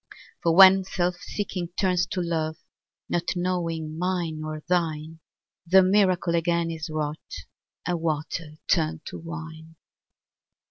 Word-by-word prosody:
For 165 -1 +2
when 190 0 +9
self 180 -1 -1
seeking 185 -4 -4
turns 180 -2 +2
to 185 -3 -2
love, 160 -2 -2 0.5
Not 175 +2 -1
knowing 165 -3 -2
mine 175 -3 -1
nor 155 0 -5
thine, 160 -2 -1 0.5
The 190 +2 +7
miracle 185 -3 +3
again 170 0 +1
is 160 0 -5
wrought, 155 0 -5 0.4
And 175 -1 -1
water 155 0 -3
turned 160 -2 +1
to - - -7
wine. 160 -1 -8
170 Hz, 125 wpm, -26 LUFS, 160-180 Hz, 0.5 s, when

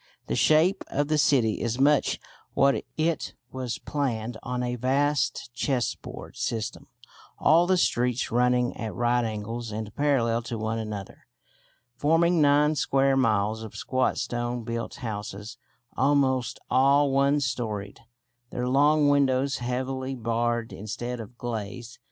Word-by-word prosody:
The - - -2
shape 165 +6 +3
of 145 +1 -1
the 155 -1 +2
city 125 -7 +2
is 120 +1 -2
much 145 +1 +3 0.4
what 140 0 +3 0.2
it 160 0 -1 0.2
was, 125 -5 -4
planned 120 -1 -3
on 125 0 -3
a 125 0 -2
vast 135 0 0
chessboard 125 0 -3
system, 110 -2 -3 0.5
all 170 +2 +4
the 185 0 +3
streets 125 -6 +1
running 125 +1 +2
at 110 -2 -5
right 120 0 +2
angles 115 +1 -4
and 105 0 -6
parallel 120 -6 +1
to 115 0 -5
one 110 +1 -2
another, 105 -3 -7 0.7
forming 165 +2 +3
nine 145 +1 +4
square 135 -2 +2
miles 110 -4 +1
of 110 -2 -9
squat 130 0 0
stone 120 0 -2
built 115 0 -4
houses, 105 -3 -6 0.4
almost 130 -3 +2
all 140 +2 +4
one 140 +2 +3
storeyed, 110 -7 -3 0.5
their 125 0 -3
long 145 +3 +4
windows 135 -1 +2
heavily 130 +2 -3
barred 120 0 -1
instead 120 +4 -5
of 115 +2 -10
glazed. 115 0 -6
125 Hz, 135 wpm, -26 LUFS, 115-140 Hz, 0.7 s, all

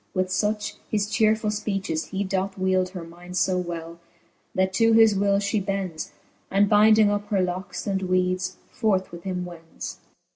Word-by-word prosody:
With 185 0 +1
fuch 210 +2 -1
his 210 -2 +1
chearefull 215 -1 +1
{peaches 195 -6 -2
he 195 +1 -3
doth 190 0 -2
wield 185 -1 +1
Her 180 -2 -7
mind 175 +2 -8
fo 185 -1 +2
well, 170 -1 -6 0.6
that 190 0 +1
to 225 +3 +4
his 225 -1 +7
will 200 0 +2
fhe 205 0 0
bends, 190 -5 -3 0.4
And 200 +1 +3
bynding 215 0 +6
up 205 0 -2
her 200 - +1
locks 180 0 -4
and 195 -1 -1
weeds, 185 0 0
forth 195 -5 0
with 170 0 -9
him 180 -1 -2
wends. 165 -2 -8
190 Hz, 170 wpm, -25 LUFS, 180-205 Hz, 0.6 s, his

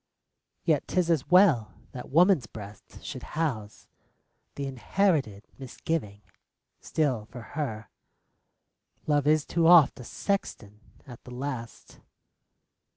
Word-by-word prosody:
Yet - - +1
't - - 0
is 170 -1 +1
as 155 -6 0
well 165 - +4 0.2
that 125 -3 -9
woman's 170 - +4
breast 105 -2 -12
should - - -6 0.2
house 120 -11 -3 0.7
The 140 - -4
inherited 135 - 0
Misgiving. 125 -5 -4 0.6
Still 130 -9 -1
for 125 +2 -10
her 110 -8 -4 1.2
Love 145 -1 +1
is 155 -1 +3
too 165 -1 +1
oft 170 -6 +6
a - - -8
sexton 110 - -4 0.3
at 125 -4 -12
the - - -12
last. 125 -2 -7
135 Hz, 115 wpm, -27 LUFS, 110-160 Hz, 1.2 s, oft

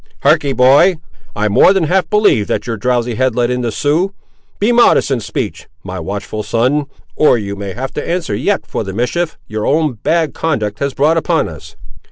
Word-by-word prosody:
"Harkee, 140 - +3
boy: 145 +8 +5 0.4
I 105 +1 0
more 105 - +5
than 190 -3 +1
half 180 +4 +1
believe 210 - +3
that 105 - -2
your 115 -2 -3
drowsy 120 +2 -1
head 130 +1 0
let 120 0 +1
in 125 0 -1
the 120 -2 -2
Siouxes. 155 - 0 0.4
Be 210 +4 +1
modest 235 -10 +4
in 130 - +1
speech, 105 - -5 0.2
my 95 0 -6
watchful 100 +4 -5
son, 130 +7 0 0.3
or 150 - +4
you 100 -2 -5
may 100 -1 -6
have 130 +3 -5
to - - -5
answer 170 -1 -2
yet 205 - -1
for - - -4
the 95 -2 -6
mischief 155 - -2
your 110 0 -4
own 155 -1 +1
bad 165 -3 +1
conduct 110 -11 -2
has 140 -1 -2
brought 155 +3 +2
upon 165 0 +1
us." 80 +1 -11
125 Hz, 200 wpm, -15 LUFS, 105-160 Hz, 0.4 s, boy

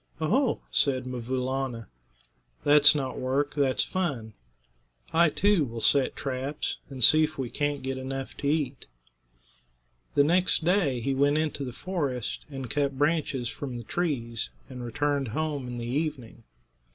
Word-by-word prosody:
"Oho!" 225 - +1
said 130 -3 +1
'Mvoo 125 0 -3
Laana; 130 -3 -3 0.8
"that's 145 0 +7
not 135 -3 -2
work; 135 +3 0
that's 140 -3 +2
fun. 140 -13 -3 0.8
I, 170 0 +5
too, 200 +1 +3
will 115 -3 -5
set 135 +4 +4
traps, 135 +1 -3
and 130 -3 -4
see 155 +7 +8
if 155 0 -2
we 130 -3 -3
can't 145 -1 -1
get 130 0 -3
enough 135 0 -5
to 140 - -3
eat." 145 -3 -1 1.3
The 145 - +6
next 165 0 +3
day 165 -9 +2
he 135 +4 0
went 145 +2 +3
into 155 -2 -1
the 125 - -4
forest 140 - -3
and 135 -3 -6
cut 140 +2 -1
branches 145 -4 0
from 130 0 -5
the 120 - -7
trees, 120 -6 -2 0.2
and 125 -2 -8
returned 140 +3 -1
home 145 +2 -2
in 120 0 -5
the 120 - -4
evening. 125 -4 -3
140 Hz, 150 wpm, -27 LUFS, 125-150 Hz, 1.3 s, see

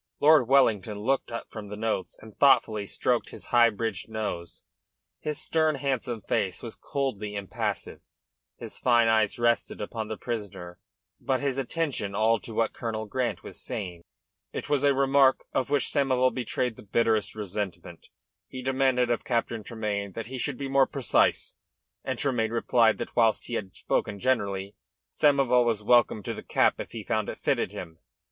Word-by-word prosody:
Lord 150 -4 +6
Wellington 110 -6 +3
looked 135 +4 0
up 115 - -6
from 110 -2 -7
the 105 - -6
notes 110 -3 -2
and 110 -1 -14
thoughtfully 110 -7 +3
stroked - - 0
his - - -11
high 120 -1 +7
bridged 110 -2 -4
nose. 105 -6 -5 0.6
His 150 -1 -3
stern, 160 -2 +1
handsome 130 -4 -2
face 95 +1 -1
was 115 - -6
coldly 110 -7 -3
impassive, 100 -2 -4 0.6
his - - -8
fine 120 -2 +4
eyes 110 -2 +2
resting 120 0 +1
upon 110 +1 -4
the 110 -1 -5
prisoner, 100 -7 -6 0.4
but 130 -1 0
his 140 -2 -1
attention 135 -8 -2
all 110 +2 +3
to 115 - -9
what 115 0 +1
Colonel 110 -2 -4
Grant 120 +3 -2
was - - -10
saying. 90 -4 -5 0.5
"It - - -6
was 145 -1 +2
a 140 -1 +4
remark 135 0 +4
of 130 -4 0
which 145 -2 +2
Samoval 130 -3 +2
betrayed 125 -2 -2
the - - -11
bitterest 110 0 +1
resentment. 95 -5 -5 0.4
He 130 -1 -8
demanded 130 -2 +2
of 120 - 0
Captain 115 -2 -1
Tremayne 105 -3 -3
that 115 +2 -5
he 130 +2 -6
should 140 0 -2
be 140 - -4
more 135 0 +4
precise, 140 -4 +1 0.5
and 130 -2 -3
Tremayne 120 -5 0
replied 115 -1 +3
that, - - -6
whilst 115 -2 +3
he - - -7
had 100 -5 -4
spoken 100 -1 -1
generally, 100 -6 0 0.4
Samoval 135 -4 +4
was 115 -3 0
welcome 120 -2 +3
to - - -3
the - - -7
cap - - +2
if - - -6
he - - -6
found - - -1
it - - -6
fitted - - 0
him. 80 -2 -8
115 Hz, 170 wpm, -27 LUFS, 105-130 Hz, 0.6 s, high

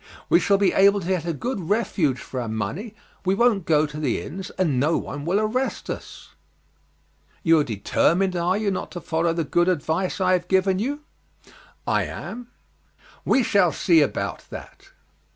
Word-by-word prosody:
We - - +6
shall 200 - +3
be 195 -1 +2
able 200 +1 +5
to 175 - -6
get 185 -3 -1
a - - +1
good 200 - -4
refuge 190 - +1
for 130 - -5
our 120 - -4
money, 140 - -4 0.3
we 190 0 +1
won't 215 -5 +2
go 155 -1 +4
to 150 0 -7
the 140 -6 0
inns, 190 +3 -7
and 155 -9 +1
no 155 +5 +2
one 145 +1 -6
will 185 +5 +2
arrest 240 +5 -2
us." - - -9 1.1
"You 165 -1 +5
are - - +3
determined, 170 - +1
are 175 +2 +1
you, 210 -2 0
not 185 - -4
to 175 - -5
follow 165 0 0
the 165 0 -1
good 175 +4 +2
advice 175 +3 -1
I 185 -1 +3
have 180 -1 0
given 190 0 +2
you?" 285 +7 -2 0.8
"I - - +1
am." 245 0 -7 0.8
"We 260 - +3
shall 200 -6 +3
see 165 -2 +3
about 145 - -2
that." - - -11
180 Hz, 180 wpm, -23 LUFS, 160-200 Hz, 1.1 s, We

